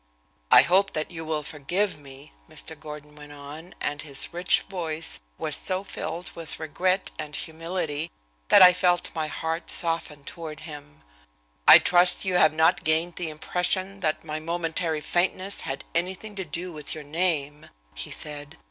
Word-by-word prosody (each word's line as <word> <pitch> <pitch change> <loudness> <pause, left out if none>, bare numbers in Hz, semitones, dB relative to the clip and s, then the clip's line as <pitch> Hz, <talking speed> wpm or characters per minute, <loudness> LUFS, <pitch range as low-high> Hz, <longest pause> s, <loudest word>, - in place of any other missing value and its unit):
"I - - +9
hope 195 +3 +3
that 155 +2 -3
you 165 -1 -6
will 155 -1 -2
forgive 175 +8 -1
me," 135 -1 -13 0.2
Mr. - - -5
Gordon 150 -1 -10
went 145 -1 -12
on, 145 +5 -11
and 145 +1 -2
his 140 +1 -2
rich 175 +1 +3
voice 165 -4 -1 0.2
was - - +2
so 185 +1 +1
filled 175 -2 -5
with 165 -2 -6
regret 185 +5 -1
and 150 -1 -4
humility 165 -1 -3 0.4
that - - +8
I 180 0 +9
felt 180 -1 +1
my 160 -2 -2
heart 160 +2 -4
soften 165 -4 +1
toward 155 0 -8
him. 150 -2 -11 0.6
"I - - +12
trust 180 +2 +5
you 190 - 0
have 155 -3 +5
not 160 +1 +3
gained 160 +2 +1
the 175 -3 -3
impression 185 +5 -2
that 155 -3 -1
my 155 0 -4
momentary 165 -1 -2
faintness 185 +4 0
had 135 0 -5
anything 185 +5 -2
to 190 - -3
do 175 +4 -4
with 150 0 -5
your 155 - -8
name," 150 -2 -2 0.2
he - - -6
said. 145 -1 -6
160 Hz, 165 wpm, -26 LUFS, 150-180 Hz, 0.6 s, I